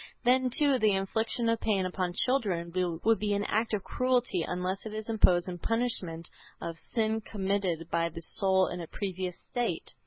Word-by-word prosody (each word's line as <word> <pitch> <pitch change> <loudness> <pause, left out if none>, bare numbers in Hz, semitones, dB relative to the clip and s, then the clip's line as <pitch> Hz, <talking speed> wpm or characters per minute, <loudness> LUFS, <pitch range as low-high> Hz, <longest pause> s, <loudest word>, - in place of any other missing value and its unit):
Then 255 +1 +4
too 275 +1 +3
the 215 -3 +4
infliction 220 +4 0
of 230 0 +2
pain 195 -4 +1
upon 180 -1 -2
children 190 -9 0 0.3
would 225 0 +4
be 205 -1 0
an 200 - 0
act 220 +2 0
of 200 - -4
cruelty 250 -7 +1
unless 180 +3 -2
it 215 -1 -6
is 215 0 -5
imposed 185 -6 +4
in 175 -1 -5
punishment 190 -8 -1 0.3
of 165 - -5
sin 220 +5 -1
committed 190 -5 -1
by 170 0 +1
the 165 0 -8
soul 190 +2 +3
in 175 -1 -4
a 165 - -6
previous 185 -2 -4
state. 245 -1 -3
200 Hz, 180 wpm, -30 LUFS, 180-225 Hz, 0.3 s, Then